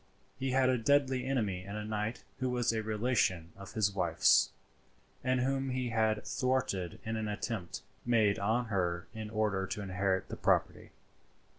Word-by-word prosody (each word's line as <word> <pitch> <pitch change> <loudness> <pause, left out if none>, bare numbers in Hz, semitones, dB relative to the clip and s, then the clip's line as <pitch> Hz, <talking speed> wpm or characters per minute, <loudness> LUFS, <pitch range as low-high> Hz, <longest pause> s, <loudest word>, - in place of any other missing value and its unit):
He 135 0 -1
had 130 0 +3
a 130 -1 +2
deadly 130 +1 +2
enemy 105 -9 0
in 100 +2 -7
a 105 0 -4
knight 105 +2 -3 0.2
who 130 -1 0
was 120 -2 +1
a 110 - 0
relation 105 -6 0
of 100 0 -10
his 110 -3 +2
wife's, 85 -4 +4 0.7
and 130 0 +2
whom 135 +1 0
he 125 -1 -1
had 110 -2 +1
thwarted 125 - -1
in 110 0 -2
an 110 -1 -2
attempt 105 -3 -4 0.2
made 110 -4 +3
on 110 +5 +1
her 85 -2 0
in 110 -1 -6
order 105 -3 0
to 105 - -4
inherit 95 0 0
the - - -5
property. - - +1
110 Hz, 165 wpm, -32 LUFS, 100-125 Hz, 0.7 s, wife's